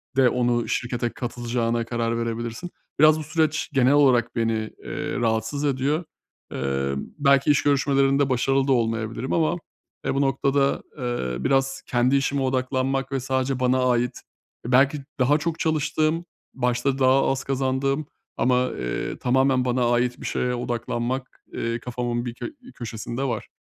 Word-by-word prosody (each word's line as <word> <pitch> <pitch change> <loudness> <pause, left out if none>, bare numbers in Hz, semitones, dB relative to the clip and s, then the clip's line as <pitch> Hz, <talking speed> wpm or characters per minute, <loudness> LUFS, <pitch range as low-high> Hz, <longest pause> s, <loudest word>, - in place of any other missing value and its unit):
de 130 -2 +5
onu 120 -1 +1
şirkete 120 -1 -1
katılacağına 120 -1 -2
karar 115 -1 -1
verebilirsin. 115 +7 -4 0.3
Biraz 155 +1 +6
bu - - -4
süreç 155 0 0
genel 130 0 +4
olarak 125 -5 +4
beni, 115 -1 +1 0.3
eee, - - -4
rahatsız 115 +5 0
ediyor. 140 +4 0 0.5
Eee, 70 0 -1
belki 140 - +2
iş 145 - +2
görüşmelerinde 140 -1 +3
başarılı 135 +2 +1
da 135 - +2
olmayabilirim 115 +1 -1
ama, 165 +1 +2 0.5
eee, - - +1
bu 140 - +2
noktada, 140 +1 +1
eee, 65 - -3
biraz 135 0 +1
kendi 125 +2 +2
işime 140 0 +1
odaklanmak 130 +1 0
ve 135 - 0
sadece 130 0 -1
bana 130 0 +2
ait, 125 0 0 0.5
e, 125 - -3
belki 135 +3 +4 0.2
daha 140 +4 +4
çok 165 +1 -3
çalıştığım, 155 +1 0 0.3
başta 125 +2 0
daha 130 +1 +4
az 135 0 -2
kazandığım 135 +2 0 0.3
ama, 125 0 +2
eee, - - -3
tamamen 130 0 +2
bana 125 -1 +1
ait 120 0 0
bir - - -7
şeye 125 0 -1
odaklanmak, 120 +2 -3
eee, 115 0 -2
kafamın 120 0 -3
bir 120 - -4
kö - - -6
bir 255 - -14
köşesinde 120 +2 -5
var. 120 -5 -2
130 Hz, 150 wpm, -24 LUFS, 120-135 Hz, 0.5 s, Biraz